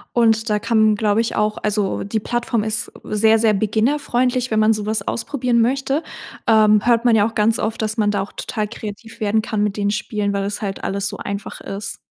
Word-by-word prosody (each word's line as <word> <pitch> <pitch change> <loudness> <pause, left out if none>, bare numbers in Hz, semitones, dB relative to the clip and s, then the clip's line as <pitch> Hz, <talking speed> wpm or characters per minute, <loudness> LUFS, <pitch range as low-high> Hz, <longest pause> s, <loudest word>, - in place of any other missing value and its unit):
Und 225 -1 +3
da 210 0 +1
kann, 220 -1 +3
glaube 210 +1 +2
ich, 230 - -3
auch 210 0 0
also, 210 -2 0
die 210 +2 -2
Plattform 240 0 -1
ist 215 -1 -1
sehr, 220 +1 +3
sehr 220 -1 +3
beginnerfreundlich, 245 +4 0
wenn 220 - +2
man 215 +1 +4
sowas 210 -1 -2
ausprobieren 240 -1 0
möchte. 270 +5 0 0.4
Ähm, 215 -1 +5
hört 235 0 +3
man 235 -2 +5
ja 210 -1 +4
auch 225 - -8
ganz 220 +1 +2
oft, 220 +1 -2
dass 220 +1 -2
man 205 -1 +2
da 200 -2 0
auch 200 - -6
total 215 -1 -3
kreativ 220 0 -9
werden 215 +1 +1
kann 215 -1 -2
mit 210 0 -1
den 205 -1 0
Spielen, 205 0 -2
weil 200 - -1
es 205 +2 -4
halt 195 -2 -4
alles 195 +1 -1
so - - -5
einfach 200 0 -6
ist. 200 +1 -5
215 Hz, 215 wpm, -20 LUFS, 205-230 Hz, 0.4 s, Ähm